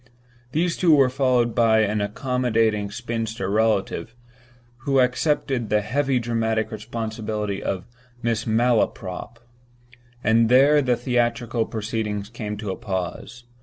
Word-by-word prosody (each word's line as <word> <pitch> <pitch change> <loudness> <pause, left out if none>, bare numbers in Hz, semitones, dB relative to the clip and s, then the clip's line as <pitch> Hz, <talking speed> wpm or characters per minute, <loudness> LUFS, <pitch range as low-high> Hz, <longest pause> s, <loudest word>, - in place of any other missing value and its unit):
These 170 +4 0
two 165 -4 +5
were 135 -3 +4
followed 125 -3 +2
by 110 -2 +4
an 105 0 0
accommodating 110 -2 0
spinster 115 -3 -4
relative, 110 +1 0 0.6
who 135 +3 +1
accepted 130 -2 +1
the 105 0 +2
heavy 135 +5 0
dramatic 115 -2 -1
responsibility 110 -2 -4
of 95 -1 -3 0.4
"Mrs. 115 -1 -1
Malaprop"—and 120 +1 -1
there 140 +4 +6
the 125 -3 +2
theatrical 120 -1 0
proceedings 105 -2 -3
came 105 -3 -5
to 105 -2 -4
a - - -3
pause. 95 +5 -5
115 Hz, 115 wpm, -23 LUFS, 110-125 Hz, 0.6 s, there